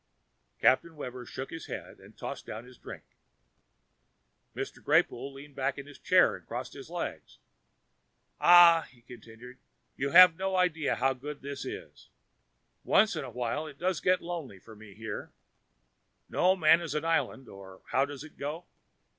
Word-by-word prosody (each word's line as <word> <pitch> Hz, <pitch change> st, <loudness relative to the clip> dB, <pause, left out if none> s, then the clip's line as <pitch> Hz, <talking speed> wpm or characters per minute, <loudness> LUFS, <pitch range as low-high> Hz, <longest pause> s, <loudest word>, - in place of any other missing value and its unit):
Captain 160 Hz, +5 st, +2 dB
Webber 125 Hz, -4 st, -7 dB
shook 135 Hz, -, -7 dB
his 165 Hz, -, -8 dB
head -, -, -8 dB
and -, -, -17 dB
tossed -, -, -7 dB
down 110 Hz, +3 st, -7 dB
his 125 Hz, 0 st, -16 dB
drink. -, -, -10 dB, 1.5 s
Mr. -, -, -6 dB
Greypoole 135 Hz, +3 st, +1 dB
leaned 140 Hz, +1 st, -12 dB
back 135 Hz, 0 st, -1 dB
in 140 Hz, -, -7 dB
his 145 Hz, -1 st, -14 dB
chair -, -, +4 dB
and -, -, -13 dB
crossed -, -, -6 dB
a -, -, -8 dB
leg. -, -, -4 dB, 1.2 s
"Ah," 170 Hz, -2 st, +7 dB
he 120 Hz, -1 st, -23 dB
continued, 120 Hz, +1 st, -13 dB, 0.4 s
"you 140 Hz, -, -2 dB
have 180 Hz, +1 st, +9 dB
no 190 Hz, +2 st, -2 dB
idea 165 Hz, -5 st, +1 dB
how 135 Hz, 0 st, +1 dB
good 140 Hz, +3 st, -9 dB
this 140 Hz, 0 st, -6 dB
is. -, -, -9 dB, 0.7 s
Once 210 Hz, -2 st, +3 dB
in 155 Hz, -, -3 dB
a 130 Hz, -, -7 dB
while 125 Hz, +6 st, -3 dB
it 145 Hz, -2 st, -11 dB
does 180 Hz, -1 st, -1 dB
get 185 Hz, 0 st, +2 dB
lonely 165 Hz, -, -6 dB
for 110 Hz, +4 st, -15 dB
me 105 Hz, -2 st, -14 dB
here 110 Hz, +1 st, -7 dB, 0.9 s
no 185 Hz, +1 st, +2 dB
man 165 Hz, -1 st, +5 dB
is 160 Hz, -4 st, -5 dB
an 150 Hz, +1 st, -2 dB
island, 160 Hz, -5 st, -1 dB
or 95 Hz, -1 st, -13 dB
how 135 Hz, -, +3 dB
does 140 Hz, 0 st, -6 dB
it 155 Hz, -, -15 dB
go? 150 Hz, +5 st, -5 dB
140 Hz, 165 wpm, -29 LUFS, 125-165 Hz, 1.5 s, have